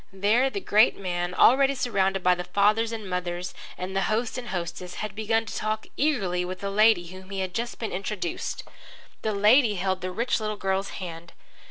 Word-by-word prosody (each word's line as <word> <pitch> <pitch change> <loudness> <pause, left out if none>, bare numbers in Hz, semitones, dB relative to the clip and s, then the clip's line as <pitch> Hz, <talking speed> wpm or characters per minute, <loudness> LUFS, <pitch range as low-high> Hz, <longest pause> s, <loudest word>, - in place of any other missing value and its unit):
There 210 +7 +2
the 400 - -4
great 215 - +4
man, 175 -1 -3
already 275 +2 +5
surrounded 195 -6 0
by 180 - +5
the 180 0 -3
fathers 210 +5 +2
and 220 -3 -5
mothers 180 0 -3 0.2
and 185 +1 -5
the 195 - +2
host 225 +2 0
and 250 -1 -5
the - - -6
hostess, 175 0 -5
had 215 -1 -4
begun 225 +1 0
to - - -7
talk 215 0 -2
eagerly 195 -12 +1
with 185 +2 -6
a 200 - -2
lady 210 -4 +4
to - - -10
whom 185 0 -12
he 195 -1 -3
had 185 -1 -3
just 235 +1 -3
been 225 - -4
introduced. 190 -2 -3 0.6
The 215 -1 -1
lady 215 +2 +5
held 190 0 -1
the 185 - -3
rich 235 +8 0
little 215 -1 -3
girl's 195 0 -1
hand. 170 -2 -8
200 Hz, 205 wpm, -26 LUFS, 180-220 Hz, 0.6 s, already